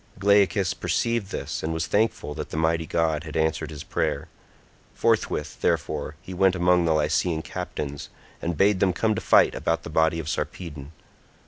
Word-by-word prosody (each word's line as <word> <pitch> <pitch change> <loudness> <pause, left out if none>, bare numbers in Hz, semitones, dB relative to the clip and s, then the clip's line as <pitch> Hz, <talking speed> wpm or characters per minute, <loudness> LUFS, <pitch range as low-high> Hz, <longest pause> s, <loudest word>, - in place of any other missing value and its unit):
Glaucus 100 -1 +3
perceived 115 0 -1
this, - - -4
and 80 +1 -2
was 80 0 -1
thankful 105 -8 0
that - - -6
the - - -5
mighty 80 0 +1
god 80 -2 0
had 80 -1 -5
answered 80 -1 0
his 75 -2 -7
prayer; - - -2 0.7
forthwith, 75 0 0
therefore, 75 0 -1
he 95 - -8
went 95 +1 +3
among 90 -1 +3
the 80 - +3
Lycian 80 +2 +1
captains, 70 -1 -5 0.3
and 85 -1 -2
bade 100 +1 +4
them 95 -1 +3
come 110 +4 +1
to - - -3
fight - - +5
about 80 0 -1
the - - -7
body 80 +1 +2
of 80 -3 -5
Sarpedon. 75 -2 -5
80 Hz, 175 wpm, -25 LUFS, 80-95 Hz, 0.7 s, fight